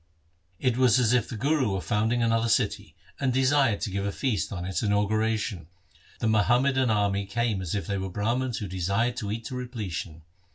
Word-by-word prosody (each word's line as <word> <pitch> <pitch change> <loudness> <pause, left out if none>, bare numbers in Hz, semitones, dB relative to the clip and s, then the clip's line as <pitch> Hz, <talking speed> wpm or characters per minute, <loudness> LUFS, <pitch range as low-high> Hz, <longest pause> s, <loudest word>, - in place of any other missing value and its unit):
It 125 -2 0
was 130 -3 +5
as 125 -2 +3
if 120 -2 +1
the 115 - -5
Guru 135 -3 +1
were 95 - -1
founding 115 +4 0
another 115 0 +2
city, 110 - 0 0.2
and 135 -2 +1
desired 130 -3 +2
to 100 - -2
give 100 +1 -2
a 100 - -1
feast 115 -3 -1
on 90 -2 -4
its 95 0 -2
inauguration. 105 -3 0 0.5
The - - -1
Muhammadan 125 +4 +3
army 100 -2 +1
came 110 -1 -1
as 90 +1 -3
if 100 -5 -2
they 100 +2 -2
were 95 0 -3
Brahmans 115 +6 -1
who 105 - -4
desired 100 +7 0
to 100 -1 -3
eat 115 +1 -4
to 130 - -5
repletion. 105 -10 -5
110 Hz, 195 wpm, -27 LUFS, 100-125 Hz, 0.5 s, was